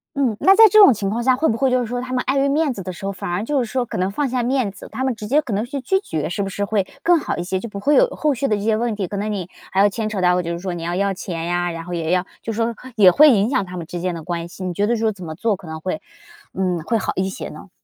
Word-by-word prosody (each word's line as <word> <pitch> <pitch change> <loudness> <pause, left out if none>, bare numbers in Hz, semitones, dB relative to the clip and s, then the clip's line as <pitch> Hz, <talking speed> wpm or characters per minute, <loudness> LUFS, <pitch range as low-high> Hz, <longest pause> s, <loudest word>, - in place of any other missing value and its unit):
嗯， 260 -6 +1
那 385 - +7
在 450 - +10
这 430 - +4
种 395 -10 +9
情 200 -2 -2
况 235 +3 -2
下， 255 0 +3
会 320 - +2
不 225 - +1
会 265 0 +2
就 255 - +3
是 245 - -1
说 245 +2 -3
他 255 0 -7
们 250 -1 0
碍 265 +2 +1
于 275 +1 +2
面 295 -2 +1
子 195 - -7
的 185 - -5
时 190 +3 -9
候， 200 - -2
反 180 - -5
而 190 +5 -1
就 285 0 0
是 - - -3
说 255 -2 0
可 - - -6
能 185 +2 0
放 285 +7 -1
下 250 -1 -1
面 250 -3 +1
子， 200 - -12
他 260 - -2
们 260 -2 0
直 215 - -8
接 280 +8 +3
可 255 -8 -5
能 205 +2 0
去 275 +4 -5
拒 385 +10 0
绝 155 - -3
是 180 +5 -2
不 195 - -3
是 200 +2 -2
会 200 -2 0 0.2
更 350 +1 +4
好 310 - -3
一 175 - -2
些？ 190 0 -1
就 235 - -6
不 200 - -6
会 290 +8 +2
有 - - +6
后 300 - 0
续 275 +2 -2
的 210 - +2
这 - - -5
些 220 +1 +2
问 235 +1 -1
题， 200 -3 -3
可 205 - -6
能 210 +2 -2
你 190 -4 -3 0.2
还 190 - 0
要 200 - +6
牵 215 +1 -3
扯 205 -3 -3
到 180 0 +3
就 170 -1 -4
是 170 - -4
说 185 -1 -4
你 170 -1 -6
要 175 +1 -2
要 200 +1 +1
钱 170 -3 -5
呀， 175 0 -1
然 165 0 -7
后 180 - -6
也 165 -1 -2
要 180 0 +2 0.2
就 225 - -4
是 220 - -6
说 230 0 0 0.2
也 190 -3 +8
会 300 - +7
影 215 0 +3
响 260 -7 0
他 180 0 -8
们 165 -2 -6
之 175 - -5
间 180 0 -1
的 165 - -6
关 170 +1 -4
系。 185 - -8
你 180 - -2
觉 205 +4 +1
得 235 +1 +1
说 220 -1 0
怎 185 -2 -11
么 160 -1 -6
做 220 +5 0
可 190 - -14
能 160 0 -6
会 160 -1 -4 0.5
嗯 185 -2 -1
会 225 +6 0
好 - - -2
一 190 +1 0
些 190 - -6
呢？ 190 - -11
205 Hz, 375 characters per minute, -21 LUFS, 180-250 Hz, 0.5 s, 在